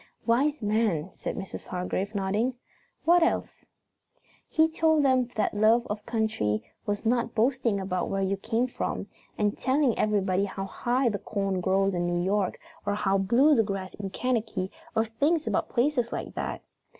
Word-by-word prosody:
"Wise 270 +4 +2
man," 205 -6 +1
said - - -5
Mrs. 190 - -7
Hargrave, 185 +3 -3
nodding. 205 +6 0 0.5
"What 345 +1 +6
else?" 335 - -1 0.8
"He 320 0 +4
told 320 -2 +2
them 255 -2 +3
that 215 - 0
love 220 +3 +4
of 210 0 -4
country 110 - 0 0.2
was 205 +2 -2
not 235 0 +1
boasting 235 -2 +2
about 185 -1 -2
where 195 0 0
you 195 +1 +1
came 230 +5 0
from, 255 - -3 0.3
and 205 -1 +1
telling 260 -1 +2
everybody 200 -2 +2
how 195 0 -5
high 245 +5 0
the 205 -2 -2
corn 195 -3 -2
grows 195 +2 +2
in 175 -1 0
New 175 0 0
York, 195 -1 0 0.3
or 205 0 0
how 195 -1 +1
blue 245 +10 +4
the 240 - +5
grass 195 -3 -4
is - - -15
in 195 -1 -3
Kentucky 220 -4 -1 0.2
or 220 - +3
things 290 +8 +1
about - - 0
places 245 -1 +1
like - - -4
that. - - -4
215 Hz, 170 wpm, -27 LUFS, 195-245 Hz, 0.8 s, What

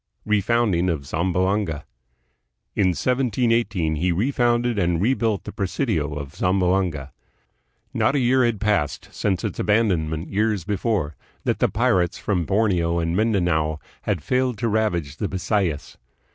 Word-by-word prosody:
Refounding 105 -4 +2
of 75 -4 -4
Zamboanga. 90 +2 0 0.9
In 100 - +3
1718 115 - +1
he 90 +4 +1
refounded 120 +2 +1
and 85 -2 +1
rebuilt 110 -1 +1
the - - -7
presidio 95 - -1
of 70 -1 -6
Zamboanga. 90 -6 0 0.8
Not - - +2
a - - +3
year 130 +1 +3
had 120 -4 +1
passed, 105 -9 0
since 95 -4 -1
its - - -3
abandonment 90 -7 +1
years 105 -2 +1
before, 100 -6 -1 0.3
that - - 0
the - - +3
pirates 90 -2 +1
from 90 -5 -1
Borneo 90 -5 +1
and 85 0 0
Mindanao 85 -8 +1 0.2
had - - -2
failed 125 -2 0
to 115 - -1
ravage 90 -10 0
the 105 - -1
Bisayas. 95 -5 -2
95 Hz, 130 wpm, -23 LUFS, 85-110 Hz, 0.9 s, In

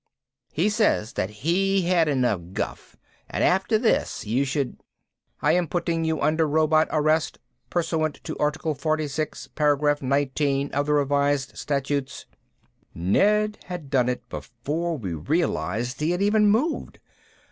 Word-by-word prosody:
He 170 +7 +1
says 210 - +1
that 95 - -1
he 180 - +1
had 170 -2 +3
enough 125 -9 +1
guff - - -5 0.3
and - - -1
after 190 +4 +3
this 225 - 0
you 120 +6 +1
should 140 -1 -2 0.3
" - - -44
"I 150 - +4
am 175 0 +2
putting 165 0 -1
you 160 -1 0
under 155 +2 +2
Robot 155 +1 +3
Arrest, 155 +1 +1 0.3
pursuant 160 -3 -1
to - - -5
article 150 +1 0
46, 155 0 -2
paragraph 145 0 +2
19 140 +1 0
of 145 +1 -1
the 150 - +2
revised 140 -1 +1
statutes 140 -1 -2 0.4
..." - - -41
Ned 210 - +2
had 175 -6 -7
done 125 -3 +3
it 125 - -4
before 155 +8 -4
we 95 -9 -4
realized 110 - -1
he 155 +2 0
had 175 +2 0
even 210 0 +4
moved. 255 +11 0
150 Hz, 145 wpm, -25 LUFS, 135-170 Hz, 0.4 s, I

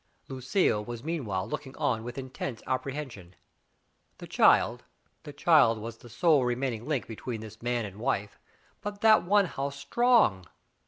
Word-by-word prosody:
Lucille 130 - 0
was 120 +1 -7
meanwhile 110 - -3
looking 130 +3 -6
on 145 -7 0
with 120 +2 -7
intense 130 -3 -6
apprehension. 130 -8 -5 0.8
The - - -9
child - - +3 0.2
— - - -43
the 145 - -7
child 145 -6 +4
was 115 +1 -7
the 120 - -15
sole 140 +4 +3
remaining 125 -1 -2
link 145 -5 -1
between 115 0 -6
this 110 0 -11
man 120 -1 -1
and 100 -1 -9
wife, 105 -5 -2 0.4
but 205 -1 -6
that 220 -1 +6
one 200 +3 +3
how 140 -5 -3
strong! 140 - +2
130 Hz, 155 wpm, -28 LUFS, 110-150 Hz, 0.8 s, that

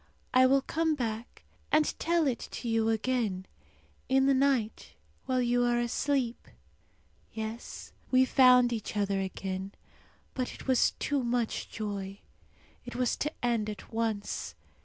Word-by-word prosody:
I 255 0 +6
will 270 +1 +3
come 320 +1 0
back 230 -3 -5 0.3
and 305 0 +5
tell 335 -1 +2
it 255 -5 0
to 240 - -5
you 225 -1 +2
again, 225 -4 0 0.6
in 265 0 +4
the 275 - +4
night 260 -5 0 0.3
while 255 -1 +1
you 245 0 +2
are 240 0 +2
asleep. 240 +1 -1 0.8
Yes, 220 +1 -6 0.2
we 260 0 +5
found 250 -2 +6
each 220 -1 -4
other 200 -1 +1
again; 190 +1 -4 0.6
but 255 -1 -3
it - - -12
was 260 -2 +3
too 285 -2 0
much 240 -1 -1
joy. 200 -2 -5 0.7
It - - -8
was 250 -1 +1
to 300 - -1
end 230 -3 +1
at 210 +1 -9
once. 220 -2 -2
240 Hz, 140 wpm, -30 LUFS, 220-260 Hz, 0.8 s, I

